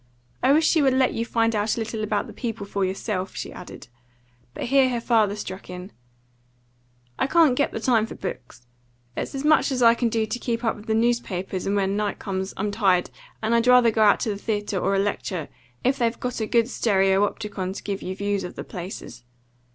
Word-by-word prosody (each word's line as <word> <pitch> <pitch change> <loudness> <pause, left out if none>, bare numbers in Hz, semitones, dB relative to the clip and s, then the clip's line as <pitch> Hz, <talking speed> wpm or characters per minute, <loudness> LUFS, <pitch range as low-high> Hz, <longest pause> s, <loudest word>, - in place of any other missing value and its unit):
I 265 - +4
wish 315 +3 +4
she 320 - +4
would 265 -2 +3
let 260 -1 +3
you 230 +1 -2
find 230 -1 +1
out 210 +2 0
a - - -1
little 225 -1 -3
about 210 -1 0
the - - -10
people 225 -4 -4
for 200 0 -2
yourself," 190 0 -3
she - - -5
added. - - -10 0.7
But - - -4
here 270 +1 +4
her 240 -2 -1
father 220 -4 +2
struck 190 -3 -7
in 180 +2 -8 1.3
"I - - +2
can't 320 -2 +5
get 285 - +1
the - - -4
time 225 -2 +2
for - - -8
books. 130 -9 -7 0.5
It's - - -4
as 270 +2 -3
much 305 -1 +4
as 255 -2 +1
I 230 0 +8
can 235 0 0
do 225 -1 0
to 245 +3 -4
keep 235 0 -2
up 225 - +1
with 210 +1 -13
the 220 - +1
newspapers; 210 -6 -1
and 200 - +1
when 195 0 +1
night 210 -1 -1
comes, 190 -1 -3
I'm 205 +1 -1
tired, 190 -4 +2 0.3
and 220 +2 +1
I'd 235 +1 +3
rather 250 -2 +6
go 220 - 0
out 210 -1 +5
to 230 - -1
the 205 - -2
theatre, 205 -2 -2
or 195 - +1
a - - +2
lecture, 195 -5 -2 0.3
if 265 +2 +1
they've 235 -1 0
got 250 -1 -3
a 220 - -1
good 230 0 +3
stereopticon 195 -3 0
to - - -7
give 200 -1 -3
you 185 - -4
views 200 0 -1
of 180 - -7
the - - -6
places. 180 -7 -8
215 Hz, 220 wpm, -24 LUFS, 195-235 Hz, 1.3 s, I